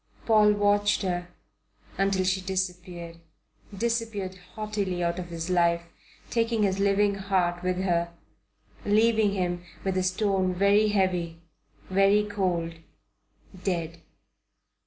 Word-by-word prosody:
Paul 215 -2 +5
watched 205 0 +2
her 175 -2 -2 0.7
until 195 -1 +1
she 190 +1 +1
disappeared 180 -2 -4 0.6
disappeared 225 -4 -2 0.2
haughtily 205 -5 -2
out 170 +1 -1
of 175 - -5
his 165 -1 -5
life, 170 -1 +2 0.5
taking 230 -2 +1
his 195 -1 +1
living 200 +1 +3
heart 190 -3 0
with 180 0 -1
her, 170 -2 0 0.7
leaving 215 0 +3
him 175 -2 -2 0.2
with 190 -1 -1
a 185 - +2
stone 185 0 0
very 200 +3 +4
heavy, 180 -5 0 0.5
very 195 +2 +4
cold, 180 -5 -2 0.8
dead. 170 -4 -2
190 Hz, 115 wpm, -27 LUFS, 175-205 Hz, 0.8 s, Paul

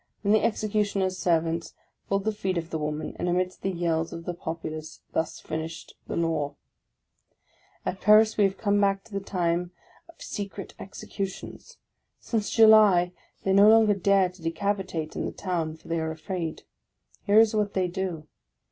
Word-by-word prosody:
Then 200 - +2
the 215 - +4
Executioner's 205 -4 0
servants 165 -1 0 0.3
pulled 195 0 +1
the 220 - +1
feet 190 -4 -2
of 165 0 -4
the 160 - -2
woman; 150 0 -3
and, 175 - -1
amidst 180 +1 -1
the 195 - -1
yells 170 -2 -1
of 170 0 -8
the 175 - -3
populace, 160 -2 -6
thus 160 - -1
finished 160 +1 -6
the - - -4
law! 160 -4 -1 1.3
At 190 - -3
Paris, 215 +2 +6
we 205 - +4
have 195 0 -1
come 205 -1 +1
back 195 -1 +2
to 220 - -17
the 200 - -1
time 175 -3 -1 0.4
of 335 - -18
secret 200 -2 -6
execu 195 0 -5
tions; 190 - -11 0.4
since 215 -3 -2
July 215 -6 +6 0.3
they 190 - +2
no 200 +2 +7
longer 220 -1 +6
dare 195 -1 +3
to 180 0 -18
decapitate 165 -1 -2
in - - -2
the - - -4
town, 165 -4 -3
for - - -19
they 165 0 -1
are 160 0 -2
afraid. 160 +1 -5 0.6
Here 205 +2 +6
is 225 -1 +5
what 210 -1 0
they 185 -1 +2
do. 175 -4 -4
185 Hz, 175 wpm, -26 LUFS, 165-200 Hz, 1.3 s, no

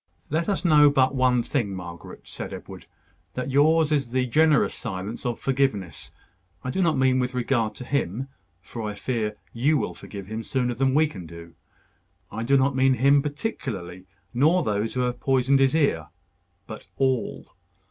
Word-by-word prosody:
"Let 165 +5 0
us 195 -2 -1
know 150 -3 +7
but 135 -1 +2
one 125 -2 +2
thing, 115 -9 -2
Margaret," 85 -2 -9
said - - -7
Edward; - - -11 0.5
"that 125 +1 -3
yours 155 +3 +4
is 140 -5 +1
the 130 +1 0
generous 150 +4 +3
silence 100 +7 -5
of 120 - -3
forgiveness. 130 -10 -1 0.5
I 130 - -3
do 190 - -1
not 165 -3 +2
mean 130 -1 +3
with 125 0 -2
regard 120 -3 0
to 125 - -8
him 130 -2 -2 0.4
for 115 - -7
I 105 -1 -4
fear 110 -3 -2 0.2
you 140 +6 +2
will - - -2
forgive 100 -2 -9
him 110 +3 -5
sooner 125 -1 -1
than 135 +2 +1
we 155 +1 +5
can 95 - -8
do. 85 0 -11 0.8
I 110 - -4
do 135 +4 +3
not 135 +1 +2
mean 130 0 +4
him 140 +3 +4
particularly, 120 - -5 0.3
nor 155 +9 +3
those 105 +2 -1
who 125 - +1
have 125 -1 -1
poisoned 135 +1 +2
his 135 +2 +3
ear; 110 - +1 0.6
but 110 - -10
all. 130 -2 -1
130 Hz, 175 wpm, -25 LUFS, 110-140 Hz, 0.8 s, know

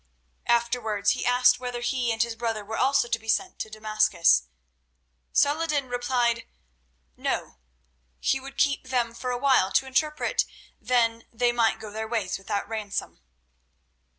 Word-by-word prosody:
Afterwards 235 -4 +1
he - - -2
asked 250 0 +4
whether 245 -1 -4
he 245 -1 0
and 225 0 +2
his 235 -1 -5
brother 225 -2 -3
were 220 +2 -5
also 270 0 +2
to 230 -1 -1
be 225 - -16
sent 370 - 0
to 220 - -4
Damascus. 215 - +2 0.8
Saladin 295 -2 +2
replied, 245 -1 0 0.7
"No; - - -3 0.6
he 265 - +1
would 275 +1 -11
keep 280 -2 +1
them 245 -3 0
for 250 +2 -5
awhile 250 -6 +3
to 270 - +3
interpret, 300 +3 0 0.3
then 230 -2 +1
they 240 +1 +2
might 235 -2 +1
go 215 -1 -8
their 220 +1 -4
ways 220 -6 -2
without 200 +1 -3
ransom." 215 -2 -4
235 Hz, 145 wpm, -26 LUFS, 220-255 Hz, 0.8 s, asked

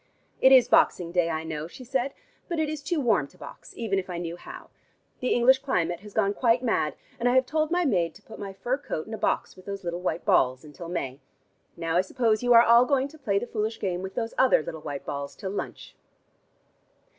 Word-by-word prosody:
"It 265 - +7
is 260 -2 +7
boxing 170 -2 +3
day, 175 -1 +2
I 160 -1 -2
know," 155 -1 -5
she 255 +9 -12
said, 260 +2 -2 0.3
"but 340 - -2
it 315 -1 0
is 305 -1 -4
too 330 +2 -1
warm 220 - +2
to - - -23
box, - - -11
even 205 -4 0
if 185 - -7
I 175 - -4
knew 170 -1 -4
how. 175 - -11 0.5
The 255 - -1
English 260 +2 +5
climate 175 -11 -1
has 205 +2 -12
gone 200 -2 +2
quite 240 +2 +2
mad, 155 - 0 0.2
and 245 +1 +2
I 245 - +2
have 260 0 +5
told 310 +3 0
my 350 +1 +1
maid 180 - +1
to 210 - -17
put 220 - -12
my 200 -2 -5
fur 245 +8 -2
coat 255 - -4
in 220 - -9
a - - -3
box - - -1
with 185 - -16
those 200 -1 -6
little 175 0 -3
white 170 -2 -2
balls 130 0 +3
until 160 +3 -9
May. 135 -6 -4 0.6
Now 165 0 -1
I - - +5
suppose 220 +2 0
you 245 0 +1
are 230 0 +9
all 235 +1 +6
going 275 0 +1
to 315 - -16
play 200 -8 0
the 220 - -1
foolish 220 -1 -3
game 180 -2 -2
with 190 0 -7
those 230 -1 -2
other 260 -11 +5
little 160 0 -7
white 145 -3 -6
balls 140 0 -5
till 190 -3 -5
lunch." 200 - -6
205 Hz, 235 wpm, -26 LUFS, 170-255 Hz, 0.6 s, are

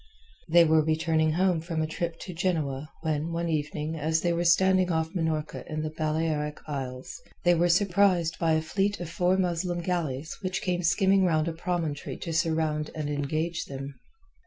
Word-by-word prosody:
They 170 +1 +7
were 160 -1 +4
returning 155 0 +1
home 180 -1 +2
from 165 -1 -2
a - - +1
trip 165 +1 -3
to 180 - -6
Genoa 155 -6 -1
when 155 0 -1
one 170 0 -2
evening 155 0 -2
as 160 +1 0
they 175 -1 +1
were 170 +1 0
standing 185 +1 +4
off 160 0 -1
Minorca 160 -4 -2
in 155 0 -2
the 155 - -3
Balearic 155 -1 -1
Isles 135 +1 -5 0.2
they 175 - +6
were 175 +1 +2
surprised 180 -2 +3
by 165 -1 +2
a 160 0 +1
fleet 195 +5 0
of 170 -2 -6
four 180 +2 +2
Muslim 175 -1 -1
galleys 160 -5 -2
which 185 -1 -2
came 180 -1 0
skimming 190 +3 +3
round 160 -3 +2
a 165 - -1
promontory 165 -3 -3
to 165 - -5
surround 160 -2 0
and 150 -2 -3
engage 155 +4 -2
them. 135 0 -7
160 Hz, 180 wpm, -27 LUFS, 155-175 Hz, 0.2 s, They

